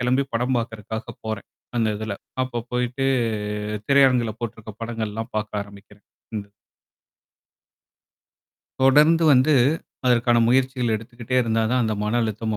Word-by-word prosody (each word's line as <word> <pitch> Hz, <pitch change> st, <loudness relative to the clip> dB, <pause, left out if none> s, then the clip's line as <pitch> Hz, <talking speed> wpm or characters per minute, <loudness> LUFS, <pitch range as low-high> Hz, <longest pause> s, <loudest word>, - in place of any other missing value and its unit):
கெளம்பி 125 Hz, +2 st, +2 dB
படம் 125 Hz, +2 st, +1 dB
பாக்கறதுக்காக 110 Hz, 0 st, -5 dB
போறேன். 110 Hz, -2 st, -4 dB, 0.3 s
அந்த 115 Hz, -2 st, +2 dB
இதுல. 110 Hz, -1 st, -4 dB, 0.3 s
அப்போ 125 Hz, -2 st, -3 dB
போயிட்டு 125 Hz, +2 st, -1 dB, 0.8 s
திரையரங்குல 130 Hz, -5 st, +4 dB
போட்டுருக்க 110 Hz, -2 st, -6 dB
படங்கள்லாம் 115 Hz, -1 st, -4 dB
பாக்க 110 Hz, 0 st, -2 dB
ஆரம்பிக்கிறேன். 100 Hz, +1 st, -16 dB, 0.3 s
இந்த 100 Hz, -1 st, -5 dB, 2.4 s
தொடர்ந்து 150 Hz, +5 st, +5 dB
வந்து 130 Hz, +4 st, +5 dB, 0.5 s
அதற்கான 120 Hz, -1 st, +4 dB
முயற்சிகள் 130 Hz, -1 st, +2 dB
எடுத்துக்கிட்டே 120 Hz, +3 st, -5 dB
இருந்தா 115 Hz, -1 st, +1 dB
தான், 125 Hz, 0 st, +2 dB
அந்த 110 Hz, -, 0 dB
மன 110 Hz, +3 st, +1 dB
அழுத்தம் 110 Hz, 0 st, -2 dB
120 Hz, 115 wpm, -23 LUFS, 110-125 Hz, 2.4 s, தொடர்ந்து